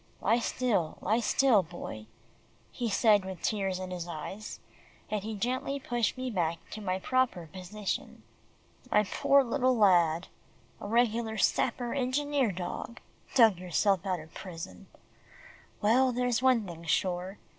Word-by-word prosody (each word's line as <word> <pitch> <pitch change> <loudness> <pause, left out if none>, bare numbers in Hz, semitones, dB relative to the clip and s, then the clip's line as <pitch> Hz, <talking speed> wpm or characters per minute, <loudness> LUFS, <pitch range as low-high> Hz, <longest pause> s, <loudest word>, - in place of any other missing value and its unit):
"Lie 225 +4 +2
still, 225 -10 0
lie 220 +2 +1
still, 240 -2 +4
Boy," 155 -11 -8 0.6
he 240 -2 -3
said 210 -1 +4
with 190 -2 -7
tears 195 -3 0
in 185 0 -6
his 175 -1 -5
eyes, 175 +6 -7 0.5
and 210 -1 0
he 220 0 -4
gently 255 +6 -2
pushed 240 -2 -1
me 255 0 -3
back 170 -5 0
to 215 - -6
my 185 -2 -1
proper 250 -4 0
position. 190 +2 -5 0.7
"My 210 - +4
poor 275 +7 +3
little 255 0 +1
lad 175 -5 +4 0.5
a - - -6
regular 230 0 +1
sapper, 240 +3 +1
engineer 275 -1 0
dog 180 +5 -6 0.4
dug 225 -8 +6
yourself 185 +1 +1
out 185 -3 -1
of 155 +1 -13
prison. 165 - -8 1.0
Well, 255 +5 +4
there's 245 -1 0
one 255 -4 +3
thing 170 -2 -9
sure. 185 +3 -1
210 Hz, 140 wpm, -30 LUFS, 180-245 Hz, 1.0 s, dug